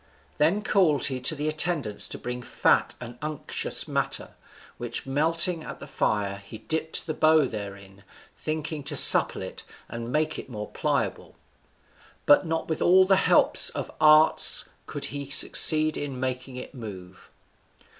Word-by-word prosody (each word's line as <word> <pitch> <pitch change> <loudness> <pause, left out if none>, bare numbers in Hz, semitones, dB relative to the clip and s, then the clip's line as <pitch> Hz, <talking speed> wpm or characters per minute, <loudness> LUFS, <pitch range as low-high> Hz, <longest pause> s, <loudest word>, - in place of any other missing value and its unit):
Then 170 +8 +1
called 175 -10 +1
he 130 -2 -2
to 125 +5 +2
the 150 +1 -4
attendants 155 -8 +1
to - - -7
bring 125 0 -6
fat - - 0
and 120 0 -11
unctuous 155 -1 -3
matter, - - -3 0.5
which 120 -1 -6
melting 165 +5 -1
at - - -10
the - - -10
fire, 100 -2 -3
he 105 +3 -11
dipped 160 +7 -3
the 160 - -4
bow 155 -1 +2
therein, 100 -3 -10 0.3
thinking 155 -1 -6
to 145 0 -4
supple - - +6
it - - -9 0.3
and 115 +1 -8
make 155 +2 -2
it - - -11
more 105 -3 -8
pliable; - - -4 0.9
but 145 +4 +3
not 160 0 -4
with 160 - -4
all 185 +1 +4
the 195 +1 +3
helps 190 - +3
of - - -7
art 155 0 +5 0.2
could - - -5
he 140 -1 -7
succeed 155 +2 +5
in 140 -3 -6
making 130 0 -5
it 125 - -9
to 140 - -16
move. 95 -5 -12
145 Hz, 155 wpm, -24 LUFS, 120-155 Hz, 0.9 s, supple